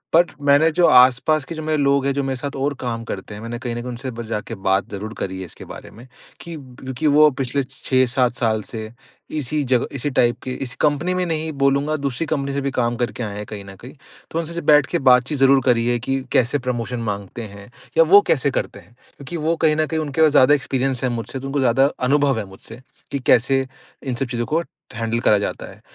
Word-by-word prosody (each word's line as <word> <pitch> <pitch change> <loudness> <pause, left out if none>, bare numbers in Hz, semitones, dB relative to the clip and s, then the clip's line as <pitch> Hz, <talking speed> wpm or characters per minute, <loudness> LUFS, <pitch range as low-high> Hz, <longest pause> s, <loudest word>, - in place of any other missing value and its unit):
But 175 0 +5 0.2
मैंने 145 +3 +5
जो 175 +2 +3
आसपास 130 +4 +5
के 165 - -7
जो 155 - -6
मेरे 155 0 0
लोग 140 -1 +2
हैं, 140 - +1
जो 140 +1 -1
मेरे 135 -1 -2
साथ 140 +2 -5
और 140 +2 -1
काम 115 -2 -4
करते 100 -1 -7
हैं, 105 - -9
मैंने 115 +1 -5
कहीं 120 -2 -4
न 120 - -4
कहीं 125 - -6
उनसे 125 +2 -6
बर 120 0 -7
जाके 110 +1 -4
बात 95 +1 +2
ज़रूर 105 +2 -6
करी 95 0 -4
है 95 - -5
इसके 85 - -11
बारे - - -10
में, 120 +4 -14 0.3
कि 170 -1 -8
ब 130 -4 -13
क्योंकि 130 +4 -2
वो 150 +1 +6
पिछले 135 +1 -2
6-7 130 -1 0
साल 110 -3 0
से 110 0 -7 0.5
इसी 150 +2 -2
जगह 125 -2 +1
इसी 140 +2 -2
टाइप 120 -2 +2
के 130 - -4
इस 130 -1 -5
कंपनी 150 +4 +1
में 180 0 0
नहीं 160 -1 -2
बोलूँगा, 140 +1 +1
दूसरी 140 +1 -2
कंपनी 140 -3 -2
से 140 - -1
भी 140 0 -2
काम 120 -2 0
करके 120 0 -3
आएँ 105 -2 -5
हैं 105 - -5
कहीं 100 -2 -8
न 95 - -11
कहीं। 120 +7 -12 0.4
तो 165 - -1
उनसे 165 0 -5
सिर्फ़ 170 -3 -5
बैठ 150 -2 +6
के 170 - -1
बातचीत 130 +2 +4
ज़रूर 135 0 +5
करी 120 -2 +2
है 120 - +2
कि 135 +2 -2
कैसे 130 +3 +2
प्रमोशन 125 -1 -3
माँगते 100 0 -5
हैं, 100 +2 -11 0.3
या 165 - +8
वो 195 +5 +7
कैसे 140 -1 +2
करते 100 - -3
हैं, 100 +5 -21 0.2
क्योंकि 145 +5 -6
वो 160 +2 0
कहीं 155 - +4
न 155 0 +1
कहीं 160 -1 -2
उनके 155 0 -2
पास 155 -2 +6
ज़्यादा 145 0 +6
एक्सपीरियंस 135 -2 -2
है 130 - +1
मुझसे, 120 +3 -4
तो 135 - -6
उनको 140 +1 -1
ज़्यादा 130 +1 +3
अनुभव 135 0 +2
है 105 - -4
मुझसे 105 +5 -13 0.3
कि 140 - -2
कैसे 130 +1 +3 0.4
इन 130 -3 -3
सब 135 - -1
चीजों 120 -1 -2
को 160 +6 0 0.3
हैंडल 115 0 -2
करा 105 -3 +4
जाता 100 - -4
है। - - -14
130 Hz, 245 wpm, -21 LUFS, 120-145 Hz, 0.5 s, या